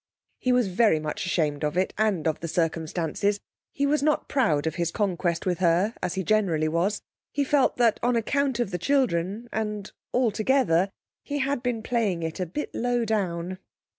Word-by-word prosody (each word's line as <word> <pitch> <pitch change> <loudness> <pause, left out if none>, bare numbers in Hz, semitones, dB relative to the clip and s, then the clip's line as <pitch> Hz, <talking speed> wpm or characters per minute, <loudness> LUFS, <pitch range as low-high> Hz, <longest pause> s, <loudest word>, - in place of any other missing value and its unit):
He 255 - +1
was 250 -3 +3
very 190 -3 +3
much 155 +4 -4
ashamed 155 -5 0
of 150 +3 -1
it 185 - +1
and 210 -7 +1
of 155 - 0
the 165 - -4
circumstances; 165 +4 -1 0.3
he 280 - 0
was 295 +1 +2
not 300 +1 +1
proud 160 - +1
of 160 - 0
his 170 -2 -1
conquest 175 -3 -1
with 180 -2 0
her, 180 +5 +3
as 180 0 -2
he 190 - -1
generally 180 -7 +2
was. 175 +6 0 0.3
He 285 - 0
felt 280 0 +2
that 235 -3 +3
on 245 0 +2
account 265 +2 0
of 235 -5 0
the 180 - -2
children, 215 - 0
and 210 -2 -3 0.2
altogether, 220 -6 +2 0.3
he 290 - -4
had 275 -2 0
been 240 -3 -2
playing 215 -8 0
it 160 +2 -4
a 180 - -1
bit 295 - -5
low 245 0 0
down. 185 -4 -2
200 Hz, 185 wpm, -26 LUFS, 170-240 Hz, 0.3 s, was